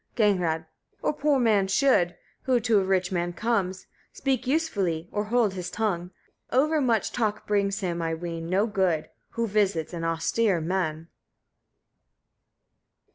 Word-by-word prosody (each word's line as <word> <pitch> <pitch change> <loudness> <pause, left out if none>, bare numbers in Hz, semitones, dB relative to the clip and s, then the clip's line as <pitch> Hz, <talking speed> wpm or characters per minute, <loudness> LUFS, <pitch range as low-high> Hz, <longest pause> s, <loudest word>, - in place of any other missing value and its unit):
Gagnrâd. 180 -7 +2 0.4
10. - - +2
A - - -8
poor 290 -1 +2
man 215 -5 +3
should, 195 -5 +3 0.3
who 255 -2 +3
to 220 -2 +3
a - - +1
rich 185 -1 +1
man 175 -1 -1
comes, 190 -4 -1 0.3
speak 265 -3 -1
usefully 200 - 0
or 210 0 -1
hold 225 -2 +2
his 180 -2 -5
tongue: 180 -6 -2 0.4
over 300 +4 +3
much 230 -5 +1
talk 215 -3 -1
brings 200 -1 0
him, 175 -2 -2
I 165 0 -1
ween, 165 0 -5
no 195 +4 +2
good, 190 -7 0 0.2
who 230 0 0
visits 195 -6 0
an 170 -1 -4
austere 170 +4 +1
man. 165 -2 -2
195 Hz, 145 wpm, -26 LUFS, 175-230 Hz, 0.4 s, man